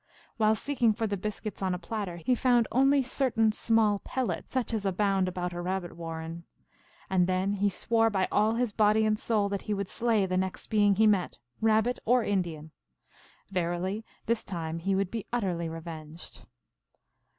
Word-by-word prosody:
While 215 Hz, -1 st, +4 dB
seeking 240 Hz, -2 st, +1 dB
for 225 Hz, +1 st, -2 dB
the 205 Hz, -2 st, -1 dB
biscuits 210 Hz, +1 st, -5 dB
on 185 Hz, -1 st, 0 dB
a -, -, -3 dB
platter, 185 Hz, 0 st, -4 dB
he 170 Hz, +10 st, +1 dB
found 245 Hz, -2 st, +3 dB
only 270 Hz, +2 st, +4 dB
certain 245 Hz, -4 st, +1 dB
small 215 Hz, -2 st, +2 dB
pellets, 260 Hz, +3 st, -3 dB
such 255 Hz, -3 st, -1 dB
as 215 Hz, -3 st, -1 dB
abound 195 Hz, -1 st, +1 dB
about 180 Hz, -1 st, -3 dB
a 175 Hz, -, -4 dB
rabbit 180 Hz, -1 st, -3 dB
warren. 165 Hz, 0 st, -6 dB, 0.6 s
And 185 Hz, -2 st, +2 dB
then 185 Hz, +2 st, 0 dB
he 205 Hz, 0 st, +1 dB
swore 225 Hz, +3 st, +2 dB
by 195 Hz, -3 st, 0 dB
all 215 Hz, +2 st, +3 dB
his 240 Hz, -1 st, 0 dB
body 215 Hz, +1 st, +3 dB
and 215 Hz, 0 st, +1 dB
soul 215 Hz, -4 st, +1 dB
that 200 Hz, -1 st, -2 dB
he 210 Hz, -, +1 dB
would 200 Hz, -1 st, -3 dB
slay 225 Hz, -4 st, +1 dB
the 185 Hz, -1 st, -1 dB
next 190 Hz, 0 st, -3 dB
being 205 Hz, -2 st, +4 dB
he 220 Hz, +3 st, +4 dB
met, 200 Hz, -4 st, +2 dB, 0.2 s
Rabbit 220 Hz, +2 st, +2 dB
or 245 Hz, +1 st, +3 dB
Indian. 170 Hz, -7 st, -2 dB, 0.8 s
Verily 185 Hz, +3 st, -1 dB, 0.2 s
this 230 Hz, 0 st, 0 dB
time 165 Hz, -4 st, -4 dB
he 195 Hz, +3 st, 0 dB
would 195 Hz, -1 st, 0 dB
be 225 Hz, -3 st, -4 dB
utterly 180 Hz, -8 st, -1 dB
revenged. 160 Hz, -1 st, -9 dB
200 Hz, 175 wpm, -29 LUFS, 180-225 Hz, 0.8 s, While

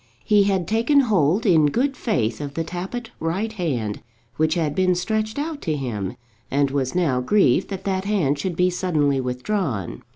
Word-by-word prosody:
He 210 Hz, -2 st, +4 dB
had 190 Hz, -4 st, 0 dB
taken 235 Hz, +6 st, +3 dB
hold 200 Hz, -, +2 dB
in 160 Hz, -7 st, +5 dB
good 265 Hz, -, 0 dB
faith 120 Hz, -, -1 dB
of 140 Hz, -1 st, -6 dB
the 165 Hz, -, -1 dB
Tappitt 190 Hz, +8 st, -5 dB
right 190 Hz, +8 st, -2 dB
hand 130 Hz, -, -2 dB, 0.3 s
which 155 Hz, 0 st, +1 dB
had 160 Hz, -4 st, 0 dB
been 185 Hz, +2 st, +2 dB
stretched 215 Hz, +5 st, -2 dB
out 300 Hz, 0 st, -3 dB
to 155 Hz, -2 st, -1 dB
him, 110 Hz, -7 st, -4 dB, 0.3 s
and 140 Hz, 0 st, +1 dB
was 135 Hz, 0 st, -1 dB
now 145 Hz, -9 st, +1 dB
grieved 135 Hz, -2 st, +3 dB
that 195 Hz, -2 st, -6 dB
that 190 Hz, -1 st, -1 dB
hand 165 Hz, -9 st, +1 dB
should 180 Hz, +2 st, -2 dB
be 180 Hz, +1 st, +2 dB
suddenly 150 Hz, -7 st, +1 dB
withdrawn. 125 Hz, -, -2 dB
175 Hz, 175 wpm, -22 LUFS, 140-210 Hz, 0.3 s, in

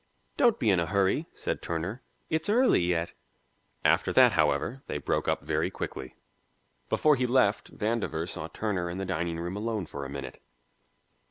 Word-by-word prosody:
"Don't 240 Hz, -5 st, +4 dB
be 110 Hz, -, +2 dB
in 95 Hz, -, +3 dB
a 85 Hz, -, 0 dB
hurry," 100 Hz, -, +1 dB
said -, -, -4 dB
Turner. 85 Hz, +9 st, -3 dB, 0.3 s
"It's 160 Hz, +5 st, -1 dB
early 245 Hz, -, +4 dB
yet." 85 Hz, -1 st, 0 dB, 0.7 s
After -, -, +3 dB
that, -, -, +7 dB
however, 130 Hz, +3 st, +1 dB
they -, -, -2 dB
broke -, -, -1 dB
up -, -, 0 dB
very -, -, 0 dB
quickly. 65 Hz, -, -6 dB, 0.7 s
Before 150 Hz, -1 st, +4 dB
he 125 Hz, -1 st, 0 dB
left 120 Hz, -4 st, +1 dB
Vandover 105 Hz, -7 st, -1 dB
saw 80 Hz, -, -4 dB
Turner 90 Hz, -2 st, -2 dB
in 85 Hz, -, -5 dB
the 95 Hz, -, -3 dB
dining 85 Hz, -2 st, -2 dB
room 85 Hz, +3 st, -4 dB
alone 110 Hz, -2 st, -2 dB
for 70 Hz, -2 st, -7 dB
a 70 Hz, -, -6 dB
minute. 70 Hz, -1 st, -7 dB
95 Hz, 170 wpm, -28 LUFS, 85-120 Hz, 0.7 s, that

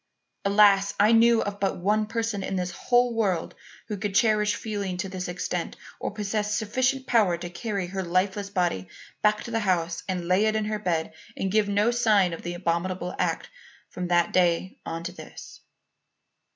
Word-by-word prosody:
Alas! 200 Hz, 0 st, +5 dB
I 210 Hz, +2 st, +5 dB
knew 230 Hz, 0 st, +5 dB
of 205 Hz, 0 st, -5 dB
but 195 Hz, -, 0 dB
one 210 Hz, +4 st, +1 dB
person 225 Hz, -2 st, -2 dB
in 190 Hz, -, -3 dB
the 180 Hz, -1 st, -1 dB
whole 245 Hz, +6 st, +1 dB
world 195 Hz, -7 st, 0 dB, 0.3 s
who 210 Hz, -, -4 dB
could 200 Hz, 0 st, -3 dB
cherish 210 Hz, -1 st, +3 dB
feeling 200 Hz, -5 st, -4 dB
to 195 Hz, -, -3 dB
this 185 Hz, -1 st, -5 dB
extent 175 Hz, 0 st, -3 dB, 0.2 s
or -, -, -2 dB
possess 210 Hz, 0 st, -2 dB
sufficient 255 Hz, +5 st, 0 dB
will 265 Hz, -, -19 dB
power 205 Hz, -8 st, +4 dB
to 175 Hz, 0 st, -7 dB
carry 200 Hz, 0 st, -3 dB
her 190 Hz, +2 st, -4 dB
lifeless 190 Hz, +3 st, 0 dB
body 175 Hz, -, -1 dB, 0.3 s
back 210 Hz, 0 st, +2 dB
to 235 Hz, -, -7 dB
the 225 Hz, -, 0 dB
house 175 Hz, -4 st, 0 dB
and 180 Hz, -2 st, -2 dB
lay 185 Hz, +4 st, +3 dB
it 215 Hz, -, +1 dB
in 215 Hz, -1 st, 0 dB
her 215 Hz, 0 st, -2 dB
bed 165 Hz, -5 st, -1 dB, 0.2 s
and 190 Hz, -, -1 dB
give 210 Hz, 0 st, +2 dB
no 205 Hz, +3 st, +2 dB
sign 215 Hz, -7 st, +3 dB
of 165 Hz, -, -6 dB
the 175 Hz, 0 st, -5 dB
abominable 180 Hz, +1 st, -2 dB
act -, -, -1 dB, 0.4 s
from 180 Hz, 0 st, -4 dB
that 175 Hz, -1 st, +2 dB
day 180 Hz, 0 st, +1 dB
on 165 Hz, 0 st, -4 dB
to 175 Hz, -, -4 dB
this. 180 Hz, -, -11 dB
200 Hz, 190 wpm, -26 LUFS, 180-215 Hz, 0.4 s, Alas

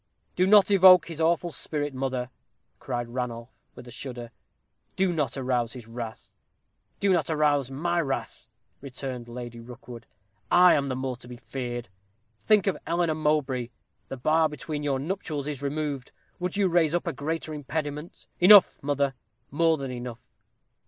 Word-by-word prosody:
"Do 185 Hz, +1 st, +3 dB
not 205 Hz, 0 st, +6 dB
evoke 185 Hz, -3 st, +7 dB
his 165 Hz, -1 st, -5 dB
awful 170 Hz, +1 st, +1 dB
spirit, 145 Hz, -2 st, -3 dB
mother," 130 Hz, -1 st, -3 dB, 0.5 s
cried 120 Hz, -2 st, -3 dB
Ranulph, 120 Hz, 0 st, -5 dB, 0.2 s
with 125 Hz, -, -12 dB
a -, -, -10 dB
shudder; 120 Hz, -2 st, -6 dB, 0.6 s
"do 190 Hz, -2 st, +1 dB
not 150 Hz, -5 st, -1 dB
arouse 125 Hz, -3 st, -1 dB
his 125 Hz, -4 st, -9 dB
wrath." 115 Hz, -1 st, -8 dB, 0.7 s
"Do 200 Hz, -1 st, +3 dB
not 165 Hz, -4 st, +1 dB
arouse 145 Hz, -4 st, +2 dB
my 170 Hz, +6 st, -1 dB
wrath," 135 Hz, -4 st, -4 dB, 0.3 s
returned 130 Hz, -2 st, -6 dB
Lady 120 Hz, -1 st, -8 dB
Rookwood. 120 Hz, 0 st, -11 dB, 0.4 s
"I 180 Hz, 0 st, +7 dB
am 140 Hz, -1 st, +1 dB
the 130 Hz, -, -2 dB
more 130 Hz, -1 st, -3 dB
to 120 Hz, -, -14 dB
be 125 Hz, 0 st, -9 dB
feared. 120 Hz, -2 st, -5 dB, 0.5 s
Think 215 Hz, -3 st, +3 dB
of 195 Hz, -, 0 dB
Eleanor 170 Hz, -1 st, +1 dB
Mowbray; 150 Hz, -6 st, 0 dB, 0.4 s
the 135 Hz, -, -6 dB
bar 155 Hz, +5 st, +2 dB
between 150 Hz, +1 st, -5 dB
your 145 Hz, -2 st, 0 dB
nuptials 150 Hz, -2 st, -3 dB
is 145 Hz, -3 st, -4 dB
removed. 145 Hz, -2 st, -3 dB, 0.3 s
Would 180 Hz, +2 st, -2 dB
you 200 Hz, -2 st, +3 dB
raise 170 Hz, -2 st, +2 dB
up 175 Hz, -, -1 dB
a 170 Hz, -, -2 dB
greater 155 Hz, +3 st, -4 dB
impediment?" 150 Hz, +2 st, -5 dB
"Enough, 195 Hz, +1 st, +7 dB
mother; 140 Hz, -1 st, 0 dB, 0.4 s
more 165 Hz, +2 st, +3 dB
than 135 Hz, -2 st, -5 dB
enough. 120 Hz, -1 st, -8 dB
145 Hz, 160 wpm, -26 LUFS, 125-165 Hz, 0.7 s, evoke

